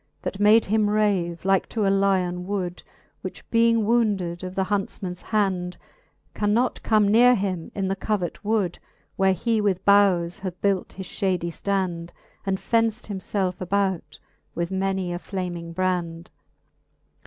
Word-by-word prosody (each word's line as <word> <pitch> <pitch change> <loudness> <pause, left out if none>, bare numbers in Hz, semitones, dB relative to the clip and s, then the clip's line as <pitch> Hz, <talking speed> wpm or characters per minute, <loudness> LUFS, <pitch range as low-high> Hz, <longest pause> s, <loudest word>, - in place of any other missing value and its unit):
That 195 - -4
made 215 +2 +6
him 215 0 +2
rave, 195 -5 0
like 195 -1 +2
to 215 -3 -1
a - - +3
lyon 185 -2 +1
wood. 185 -3 -3 0.4
Which - - -8
being 230 -1 +4
wounded 205 -7 +1
of 185 0 -6
the 190 - +1
huntfman's 190 -2 -3
hand. 185 -4 -1 0.6
Can 210 0 +1
not 250 +2 +1
come 215 -2 +3
neare 240 +4 +6
him 190 -5 -3
in 195 -1 -1
the 195 - 0
covert 195 -2 -2
wood. 205 -5 0 0.4
Where 190 0 +3
he 225 +4 0
"with 195 -2 0
boughes 195 -3 +4
hath 185 -2 -6
built 195 -2 0
his 190 - -7
ftiady 180 -3 -1
ftand, 180 -3 -2 0.4
And 190 0 +1
fenft 225 +2 0
himfelfe 190 -1 -2
about 190 -1 -1 0.4
with 170 +1 -2
many 190 -1 -1
a 175 - -4
flaming 175 -3 -5
brand. 175 -2 -2
195 Hz, 150 wpm, -24 LUFS, 180-205 Hz, 0.6 s, made